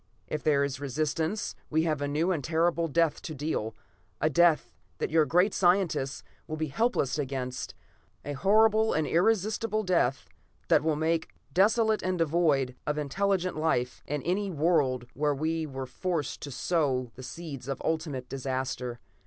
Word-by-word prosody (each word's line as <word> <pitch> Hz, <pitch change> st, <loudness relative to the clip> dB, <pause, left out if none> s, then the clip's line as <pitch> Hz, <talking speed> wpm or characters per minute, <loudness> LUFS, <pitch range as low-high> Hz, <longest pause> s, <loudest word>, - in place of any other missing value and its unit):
If 155 Hz, -, -4 dB
there 145 Hz, -2 st, +3 dB
is 140 Hz, -1 st, -2 dB
resistance, 155 Hz, -, -1 dB, 0.2 s
we 160 Hz, +1 st, +2 dB
have 155 Hz, -3 st, 0 dB
a 145 Hz, -, 0 dB
new 155 Hz, +6 st, +1 dB
and 160 Hz, -6 st, -1 dB
a -, -, -5 dB
terrible 165 Hz, +1 st, +2 dB
death 165 Hz, 0 st, +1 dB
to 155 Hz, -, -6 dB
deal. 135 Hz, -7 st, -2 dB, 0.4 s
A 155 Hz, -, +2 dB
death 170 Hz, +1 st, +3 dB, 0.2 s
that -, -, -2 dB
your 160 Hz, -1 st, +4 dB
great 180 Hz, +4 st, +3 dB
scientists 170 Hz, -, +1 dB, 0.2 s
will 155 Hz, -, -4 dB
be 155 Hz, -1 st, -2 dB
helpless 150 Hz, -, 0 dB
against; 130 Hz, -2 st, -4 dB, 0.5 s
a 145 Hz, -, -3 dB
horrible 220 Hz, +7 st, +4 dB
and 155 Hz, -, +1 dB
irresistable 215 Hz, +5 st, +1 dB
death 170 Hz, -9 st, +1 dB, 0.4 s
that -, -, +5 dB
will 160 Hz, -1 st, +1 dB
make 160 Hz, +2 st, 0 dB, 0.2 s
desolate 220 Hz, +3 st, +3 dB
and 185 Hz, 0 st, -1 dB
devoid 150 Hz, -6 st, +2 dB
of 150 Hz, 0 st, 0 dB
intelligent 185 Hz, +4 st, 0 dB
life 140 Hz, -6 st, 0 dB
any 180 Hz, +8 st, -1 dB
world 150 Hz, -7 st, +1 dB
where 145 Hz, 0 st, +1 dB
we 160 Hz, +2 st, -1 dB
are 135 Hz, -2 st, -5 dB
forced 165 Hz, +1 st, -3 dB
to 145 Hz, -, -5 dB
sow 135 Hz, -4 st, 0 dB
the 130 Hz, -, -11 dB
seeds 140 Hz, -2 st, -7 dB
of 135 Hz, -1 st, -3 dB
ultimate 150 Hz, -6 st, -2 dB
disaster. 130 Hz, -2 st, -3 dB
155 Hz, 160 wpm, -28 LUFS, 135-175 Hz, 0.5 s, that